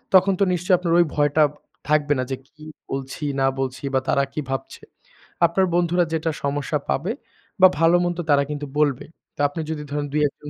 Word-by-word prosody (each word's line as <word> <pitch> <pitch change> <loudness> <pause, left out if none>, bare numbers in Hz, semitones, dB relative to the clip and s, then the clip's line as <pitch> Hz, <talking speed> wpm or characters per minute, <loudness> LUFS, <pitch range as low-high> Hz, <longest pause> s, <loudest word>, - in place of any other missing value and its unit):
তখন 190 +1 +6
তো - - +4
নিশ্চয়ই 180 +1 +2
আপনার 170 -2 0
ওই 175 - +5
ভয়টা 145 +1 +3 0.5
থাকবে 150 -1 +3
না - - +1
যে, - - 0
কি 155 +1 -16 0.3
বলছি 135 +2 -5 0.2
না 135 - +4
বলছি? 130 0 -3
বা 130 - +4
তারা 140 - +3
কি 150 - -2
ভাবছে? 135 0 -5 0.6
আপনার 180 +3 +2
বন্ধুরা 175 0 +2
যেটা 160 0 0
সমস্যা 145 +2 -1
পাবে 170 +10 0 0.5
বা 185 - +11
ভালো-মন্দ 175 +1 +3
তারা 140 -1 +5
কিন্তু 145 0 -4
বলবে। 145 -4 +1 0.3
তা - - -2
আপনি 155 +3 -5
যদি 150 -2 -4
ধরেন 145 0 -2
২-১জন 150 0 -1
150 Hz, 185 wpm, -22 LUFS, 145-170 Hz, 0.6 s, বা